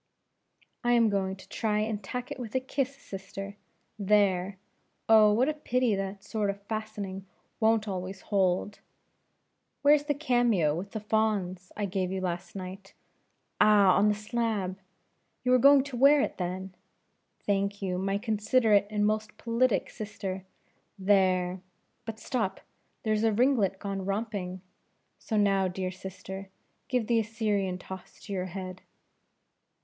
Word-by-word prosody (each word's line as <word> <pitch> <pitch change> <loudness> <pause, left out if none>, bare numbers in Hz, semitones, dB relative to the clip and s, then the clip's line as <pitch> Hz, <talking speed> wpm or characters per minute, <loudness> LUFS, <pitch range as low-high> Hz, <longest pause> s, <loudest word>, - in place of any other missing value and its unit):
"I 240 0 +3
am 230 -2 +5
going 190 -1 0
to 190 - -15
try 215 -2 -1
and 215 -1 -2
tack 250 +7 -5
it 285 - -5
with 235 -2 -6
a - - +4
kiss, 270 +1 -2
sister, 195 -4 -8 0.4
there! 195 -2 +2 0.5
oh, 215 -1 +7
what 240 +6 +3
a 310 - +1
pity 250 -6 +1
that 195 0 -3
sort 205 0 -1
of 200 0 -3
fastening 205 -3 -5 0.3
won't 220 -1 +3
always 190 0 -4
hold! 195 0 0 1.0
where's 290 0 +5
the 290 -1 0
cameo 240 - +2
with 185 +5 -5
the 220 - -2
fawns, 205 -4 0
I 210 - 0
gave 185 -1 -1
you 190 - -2
last 175 0 -4
night? 190 +1 -8 0.6
Ah! 205 -3 +6
on 205 - +4
the 210 - +2
slab 210 -4 -2 0.6
you 250 - +2
were 255 - +6
going 275 +1 +7
to 280 -2 -7
wear 280 +4 +6
it - - -2
then? 185 +1 -4 0.7
Thank 200 0 0
you, 180 -1 -1
my 195 +1 0
considerate 215 -1 +2
and 210 -1 +1
most 215 0 -1
politic 235 0 +1
sister 200 -3 -5 0.5
there! 185 -2 +2 0.4
but 225 -1 -5
stop 220 -4 -2 0.4
here's 215 -1 +1
a 225 - +4
ringlet 220 -4 +2
gone 195 -1 -4
romping 195 -2 -3 0.6
so 220 - -2
now, 195 -2 +3
dear 185 0 -3
sister, 190 +1 -8 0.4
give 250 -3 0
that 235 - 0
Assyrian 210 -4 -1
toss 190 0 -10
to 205 - -7
your 185 -1 -1
head." 185 0 -7
205 Hz, 145 wpm, -29 LUFS, 190-225 Hz, 1.0 s, oh